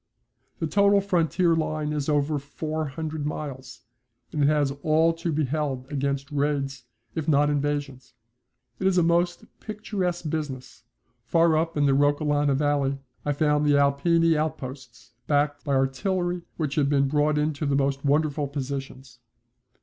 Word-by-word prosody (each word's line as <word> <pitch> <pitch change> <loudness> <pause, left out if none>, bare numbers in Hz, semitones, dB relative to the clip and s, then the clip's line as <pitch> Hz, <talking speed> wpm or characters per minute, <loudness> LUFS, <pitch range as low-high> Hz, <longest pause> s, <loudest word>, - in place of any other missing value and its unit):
The - - -2
total 200 +4 +4
frontier 175 -2 +2
line 155 -1 -1
is 150 0 -2
over 145 0 +1
four 155 +2 -4
hundred 155 +2 -4
miles, 145 -3 -6 0.5
and 150 - -2
it 140 - +4
has 145 -2 +2
all 160 +2 +3
to 165 0 -3
be 155 0 +1
held 135 -2 -2
against 140 0 -2
raids 140 -3 -1 0.3
if 160 -3 -4
not 145 -1 +3
invasions. 145 -3 -3 0.6
It 190 - +1
is 190 -1 +2
a 175 - +5
most 175 +1 +1
picturesque 195 -6 -3
business. 135 -6 -5 0.4
Far 165 +3 +4
up 165 0 0
in 145 - +3
the 140 - +4
Roccolana 145 0 +2
Valley 140 -1 +1 0.3
I 145 - +1
found 150 0 +2
the 145 -1 +4
Alpini 165 +4 +3
outposts, 135 -6 -5 0.2
backed 145 0 +1
by 140 -2 0
artillery 175 +7 0 0.2
which 150 -4 -2
had 145 -2 +1
been 140 -1 +3
brought 150 +1 +1
into 150 0 -1
the 140 - +1
most 140 0 0
wonderful 145 0 +1
positions. 135 -2 -6
145 Hz, 150 wpm, -25 LUFS, 140-160 Hz, 0.6 s, a